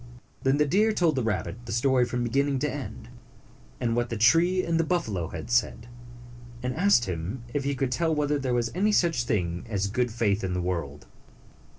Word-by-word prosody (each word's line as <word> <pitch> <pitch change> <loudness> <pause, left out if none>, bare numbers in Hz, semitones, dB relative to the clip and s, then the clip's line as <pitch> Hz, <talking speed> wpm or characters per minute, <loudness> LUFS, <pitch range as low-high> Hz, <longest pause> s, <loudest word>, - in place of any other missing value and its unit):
Then 135 +1 +2
the 150 - +3
deer 210 +8 +2
told 170 -5 +2
the 130 - 0
rabbit 105 -1 -3
the - - -5
story 125 +2 +2
from 120 0 -2
beginning 135 +4 +1
to 145 0 -1
end, 135 -4 -7 0.7
and 115 -1 0
what 120 0 0
the 115 - -3
tree 170 - +4
and 165 -1 0
the - - +3
buffalo 110 - -1
had 115 - -7
said, 120 -1 +1 0.8
and 125 0 -1
asked 180 -8 +4
him 95 +7 -4
if 140 -1 -1
he 140 0 0
could 130 -1 -1
tell 160 +4 +1
whether 150 -1 0
there 130 -2 -1
was 120 -1 0
any 205 +4 +1
such 165 -11 +2
thing 90 -7 -1
as 100 -3 -1
good 120 +5 0
faith 110 -3 0
in 95 -1 -2
the 90 - -1
world. 85 -5 -4
125 Hz, 205 wpm, -27 LUFS, 110-150 Hz, 0.8 s, tree